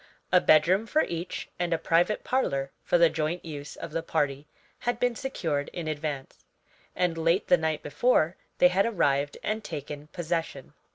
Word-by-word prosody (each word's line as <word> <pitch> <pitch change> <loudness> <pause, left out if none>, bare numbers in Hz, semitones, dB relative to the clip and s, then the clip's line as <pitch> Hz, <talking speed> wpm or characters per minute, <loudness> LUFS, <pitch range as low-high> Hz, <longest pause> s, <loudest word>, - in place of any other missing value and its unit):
A - - +6
bedroom 180 +8 +4
for 310 +6 +3
each, 170 +1 -4
and 175 -1 -1
a - - +2
private 170 +6 +1
parlor 140 - 0
for - - +3
the 170 0 +6
joint 160 +2 -2
use 145 -2 -7
of - - -7
the 165 - -1
party, 145 -3 -1 0.3
had 240 - -1
been 245 -1 +1
secured 160 - -2
in 170 -3 -5
advance, 145 -3 -4 0.5
and 175 -2 0
late 165 +5 +1
the - - +8
night 160 -2 -1
before 165 - +2 0.2
they 180 - +6
had 195 +4 +2
arrived 145 -9 +1
and 215 +1 -2
taken 145 -1 -6
possession. 165 -4 -4
165 Hz, 170 wpm, -27 LUFS, 150-180 Hz, 0.5 s, the